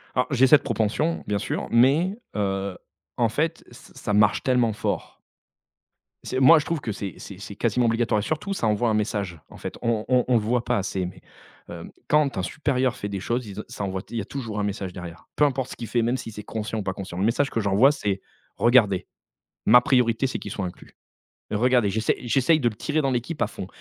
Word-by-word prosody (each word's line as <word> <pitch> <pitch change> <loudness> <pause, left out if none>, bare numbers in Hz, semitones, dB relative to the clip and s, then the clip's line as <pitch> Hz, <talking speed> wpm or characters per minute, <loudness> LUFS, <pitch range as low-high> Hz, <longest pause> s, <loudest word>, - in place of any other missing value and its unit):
Alors, 125 0 +2
j'ai 130 0 +5
cette 150 - +6
propension, 120 +8 0
bien 105 -1 0
sûr, - - -3
mais 150 - +4 0.2
heu, 95 -2 -1 0.4
en 115 -2 +3
fait, 160 +7 -1
ç - - -15
ça 105 - -3
marche 105 0 +3
tellement 125 -3 +2
fort. - - -3 1.1
C'est 130 - -2
moi 155 +4 +8
je - - -5
trouve 165 -4 -2
que 110 - -3
c'est 100 -1 -5
c'est 100 - -10
c'est 100 0 -8
quasiment 120 +2 +1
obligatoire 115 -2 +1
et - - -3
surtout 175 - -2
ça 115 - -1
envoie 110 +2 +2
un - - +1
message 100 -5 -2
en - - -13
fait, - - -6
on 115 -2 0
on 125 -1 +3
on 125 - +2
le - - +5
voit 120 +3 0
pas - - 0
assez 95 -1 -2
mais 90 +1 -9 0.5
hem, - - -8 0.2
quand 150 -6 +2
un 95 - -1
supérieur 130 0 0
fait 100 - -5
des 100 -1 -3
choses, 120 +4 -2
ils 100 +1 -7
en - - -4
ça 100 - -6
envoie 95 -1 -3
il 120 - -5
y - - 0
a - - -7
toujours 115 -6 -5
un - - 0
message 95 -2 -3
derrière. 85 -1 -9
Peu 150 - +2
importe 130 -2 -1
ce - - -6
qu'il 115 - -7
fait, 120 - +1
même 120 +3 +1
si 115 -2 -7
c'est 105 0 -8
conscient 110 0 -4
ou - - -3
pas 95 - -2
conscient, 95 -3 -7
le 100 - +1
message 135 +5 +2
que 115 - -2
j'envoie, 105 +7 +4
c'est: 100 -8 -2 0.4
«Regardez, 115 -6 +4 0.6
ma 125 +3 +8
priorité, 125 0 +2
c'est 130 - -3
qu'il 105 - -7
soit 95 - -3
inclus. 90 - -11 0.6
Regardez, 120 0 +3
j'essaie 110 +3 +1
j'essaye 135 +6 +3
de 120 -3 +2
le 105 - -10
tirer 150 +6 -1
dans 135 -2 0
l'équipe 125 +6 -3
à 115 - +3
fond» 95 - -7
115 Hz, 235 wpm, -24 LUFS, 100-130 Hz, 1.1 s, moi